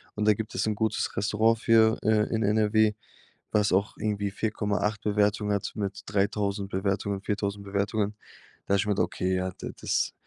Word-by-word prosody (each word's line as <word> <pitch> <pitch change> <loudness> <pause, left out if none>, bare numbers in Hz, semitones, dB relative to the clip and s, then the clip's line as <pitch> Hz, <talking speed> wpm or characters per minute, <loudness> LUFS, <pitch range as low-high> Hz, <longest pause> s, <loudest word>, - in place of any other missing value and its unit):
Und 105 - -1
da 105 - +7
gibt 110 +1 -6
es - - 0
'n 110 - +1
gutes 110 +1 -1
Restaurant 110 +3 +2
für 110 -1 +4
äh, 110 -1 +3
in 110 - 0
NRW, 105 +1 +3 0.6
was 105 -1 +2
auch 100 +3 +1
irgendwie 105 -1 -1
4.8 105 0 -1
Bewertungen 105 0 +1
hat 100 - -2
mit 100 -2 -3
3.000 100 0 -1
Bewertungen, 95 +1 -1
4.000 100 -1 -2
Bewertungen. 100 +1 -1 0.5
Da 100 - +2
habe - - +3
ich 100 - +1
gemeint, 105 -1 0
okay, 95 0 0
ja, 95 0 -2
da - - -5
das - - 0
105 Hz, 175 wpm, -27 LUFS, 100-110 Hz, 0.6 s, da